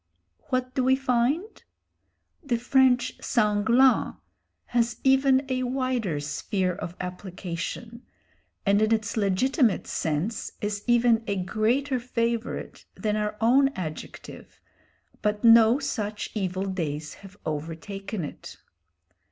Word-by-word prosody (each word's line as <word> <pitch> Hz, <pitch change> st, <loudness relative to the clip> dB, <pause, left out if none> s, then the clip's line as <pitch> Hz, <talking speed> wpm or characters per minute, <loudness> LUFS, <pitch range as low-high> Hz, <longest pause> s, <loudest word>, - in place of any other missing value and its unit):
What 255 Hz, 0 st, -1 dB
do 260 Hz, -, 0 dB
we 260 Hz, +1 st, +4 dB
find? 270 Hz, -, 0 dB, 0.8 s
The 250 Hz, -5 st, 0 dB
French 250 Hz, 0 st, +2 dB
sanglant 230 Hz, +4 st, +3 dB, 0.5 s
has 235 Hz, -1 st, 0 dB
even 265 Hz, 0 st, +4 dB
a 255 Hz, -1 st, -1 dB
wider 250 Hz, -, -1 dB
sphere 180 Hz, +6 st, -2 dB
of 175 Hz, 0 st, -7 dB
application, 180 Hz, +5 st, -6 dB, 0.6 s
and 200 Hz, +1 st, +3 dB
in 215 Hz, +1 st, +2 dB
its 220 Hz, -2 st, 0 dB
legitimate 225 Hz, -, +2 dB
sense 160 Hz, +8 st, -2 dB
is 205 Hz, 0 st, -3 dB
even 240 Hz, -1 st, +4 dB
a 200 Hz, -, 0 dB
greater 235 Hz, +8 st, 0 dB
favourite 235 Hz, -1 st, -3 dB
than 210 Hz, -2 st, -1 dB
our 210 Hz, 0 st, -2 dB
own 260 Hz, +5 st, +5 dB
adjective, 155 Hz, -4 st, -8 dB, 0.6 s
but 210 Hz, 0 st, -1 dB
no 230 Hz, +1 st, +7 dB
such 215 Hz, -7 st, -3 dB
evil 190 Hz, -2 st, -2 dB
days 155 Hz, -5 st, -3 dB
have 195 Hz, 0 st, -13 dB
overtaken 165 Hz, +5 st, -4 dB
it. -, -, -10 dB
220 Hz, 110 wpm, -26 LUFS, 190-250 Hz, 0.8 s, no